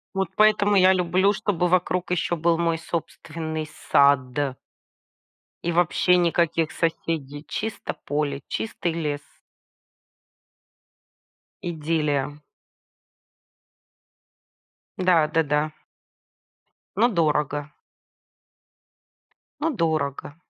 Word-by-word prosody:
Вот 195 -3 0
поэтому 210 -1 +4
я 185 0 +6
люблю, 185 +3 +2
чтобы 180 -3 0
вокруг 180 0 +1
ещё 175 -1 0
был 165 +1 +2
мой 165 -1 +1
собственный 160 -1 -5 0.2
сад. 140 -1 +3 1.1
И 175 - 0
вообще 175 +1 +3
никаких 165 -2 +1
соседей. 155 -3 -3
Чисто 220 0 -4
поле, 145 -1 -1
чистый 175 -6 -3
лес. 150 -3 -2 2.4
Идиллия. 150 -3 -1 2.6
Да, 175 -4 +3
да, 160 +1 +1
да. 150 +1 0 1.2
Но 235 +4 +4
дорого. 150 - 0 1.9
Но 320 - +1
дорого. 155 - -1
165 Hz, 80 wpm, -24 LUFS, 150-180 Hz, 2.6 s, я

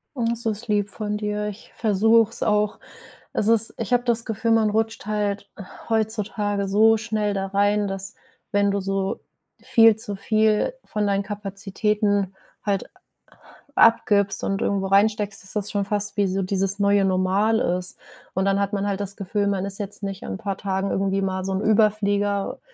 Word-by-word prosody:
Oh, 240 -3 -1
das 235 0 -3
ist 220 +2 -2
lieb 205 -1 +1
von 210 0 -3
dir. 210 0 -2
Ich 210 +1 -9
versuch's 225 +1 +3
auch. 210 -1 +1 0.5
Es 210 - 0
ist 225 -1 +2
ich 230 +1 -2
habe 245 - +3
das 235 -1 0
Gefühl, 225 0 -1
man 220 -1 +4
rutscht 225 +1 -1
halt 205 -1 -2 0.4
heutzutage 210 -2 -1
so 220 +3 +5
schnell 215 -1 -1
da 195 0 -2
rein, 205 +1 +1
dass, 195 +1 -5 0.4
wenn 200 -1 +2
du 200 - 0
so 195 0 -2 0.4
viel 225 -2 +5
zu 220 -2 -4
viel 215 - +1
von 210 -1 -2
deinen 200 0 +1
Kapazitäten 200 0 -1 0.3
halt 200 -2 -1
a - - -25 0.8
abgibst 205 -3 +4
und 195 +2 -1
irgendwo 200 -3 0
reinsteckst, 200 0 +2
ist 190 - -6
das 210 -1 -2
schon 200 -1 0
fast 205 0 -1
wie 205 -1 +2
so 190 +1 -1
dieses 195 +1 0
neue 200 0 +3
Normal 190 +4 +2
ist. 180 +1 -1 0.4
Und 190 +1 +1
dann 195 0 +2
hat 200 +1 0
man 200 -1 -1
halt 200 0 -1
das 200 0 -5
Gefühl, 200 +1 -1
man 195 -1 0
ist 200 +1 -5
jetzt 205 0 -6
nicht 195 -1 -5
an 95 - -5
'n - - -4
paar 195 -1 -4
Tagen 195 0 -2
irgendwie 195 0 0
mal 190 -1 -2
so 195 - -2
'n 190 - -1
Überflieger, 205 -2 +1
205 Hz, 180 wpm, -23 LUFS, 195-215 Hz, 0.8 s, so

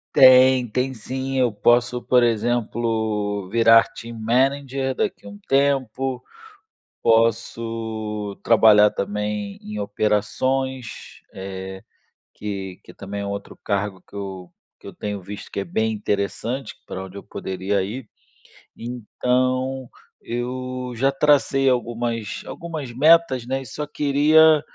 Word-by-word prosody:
Tem, 130 -1 +7
tem 130 +4 -1
sim. 130 +3 -5
Eu 125 -3 +3
posso, 120 +3 +2
por 125 -1 +3
exemplo, 110 -3 -1
virar 115 0 +6
team 115 0 -9
manager, 135 +3 0
daqui 100 - -3
um 100 0 -10
tempo. 135 -2 +1 0.8
Posso 115 -2 0
trabalhar 105 -2 +6
também 105 0 -3
em 105 0 -7
operações, 120 +5 -2
eh, 95 0 -7 0.5
que 95 -3 -6
que - - -14
também 100 +1 -6
é - - -4
um - - -3
outro 100 0 -7
cargo 100 -2 -2
que - - -19
eu 95 -3 -6 0.3
que - - -16
eu - - -9
tenho 105 -1 -4
visto 100 +3 -9
que - - -6
é - - -3
bem 110 +5 0
interessante, 105 +5 -3
pra 95 0 -6
onde 95 +1 -11
eu - - -9
poderia 95 0 -2
ir. 110 +4 -6 0.7
Então 130 +2 -1 0.3
eu 125 +1 -4
já 135 +2 +2
tracei 135 -1 +3
algumas 120 -3 -2
algumas 155 -7 -6
metas, 135 -2 +4
né, 135 +1 -1
e 135 - -10
só 150 +6 -5
queria 150 +2 +4
115 Hz, 125 wpm, -22 LUFS, 105-130 Hz, 0.8 s, Tem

